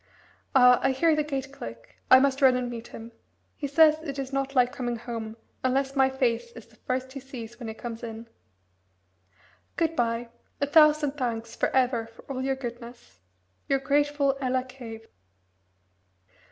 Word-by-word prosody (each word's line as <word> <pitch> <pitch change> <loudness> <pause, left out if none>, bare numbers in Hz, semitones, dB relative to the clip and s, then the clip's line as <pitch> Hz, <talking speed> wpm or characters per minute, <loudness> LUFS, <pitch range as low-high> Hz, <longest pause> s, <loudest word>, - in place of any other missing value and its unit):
Ah! 250 -1 +7
I 270 - +2
hear 320 +4 +3
the 305 - +1
gate 275 -2 -4
click 115 - -10
I 260 - +10
must 275 0 +1
run 260 -2 +6
and 250 -1 -2
meet 235 -1 -7
him. 230 +1 -10 0.4
He 285 - -4
says 310 +2 +5
it 285 -4 -6
is 270 0 -5
not 275 0 -2
like 250 0 +3
coming 245 -3 -3
home 230 -1 -6 0.3
unless 270 +1 0
my 265 -1 +4
face 240 -3 -1
is 230 - -11
the 230 - -24
first 255 +3 -3
he 275 - -7
sees 240 -3 -9
when 235 - -6
he 220 - -6
comes 230 0 -7
in. 225 0 -7 1.5
Good 330 -1 0
bye. 235 -2 -1 0.3
A 285 - +2
thousand 305 -1 +5
thanks 230 -3 -3
for - - +1
ever 250 -3 +1
for 230 - -17
all 260 -2 -5
your 270 0 0
goodness. 240 - -9 0.5
"Your 275 - +3
grateful 285 0 +1
Ella 255 -1 0
Cave." 240 -4 -10
255 Hz, 170 wpm, -27 LUFS, 235-275 Hz, 1.5 s, I